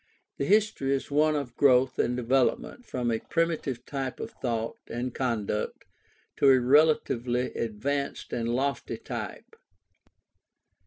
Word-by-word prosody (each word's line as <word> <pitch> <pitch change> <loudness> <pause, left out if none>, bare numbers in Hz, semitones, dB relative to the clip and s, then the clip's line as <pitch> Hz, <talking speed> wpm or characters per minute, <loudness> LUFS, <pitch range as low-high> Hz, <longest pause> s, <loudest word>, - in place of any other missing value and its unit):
The 140 - 0
history 200 -9 +2
is 135 - -5
one 155 +1 +3
of 140 -5 -4
growth 130 -2 +4
or - - +3
development 125 - 0
from 120 -2 -1
a 115 - 0
primitive 165 -6 -1
type 135 -3 -4
of 115 - -5
thought 115 -3 -3
and 120 +1 -4
conduct 110 -5 -2 0.5
to 140 - +5
a 130 -1 +7
relatively 125 -3 +2
advanced 140 +6 -3
and 115 -1 -1
lofty 135 +4 -1
type. - - -7
130 Hz, 125 wpm, -28 LUFS, 120-140 Hz, 0.5 s, a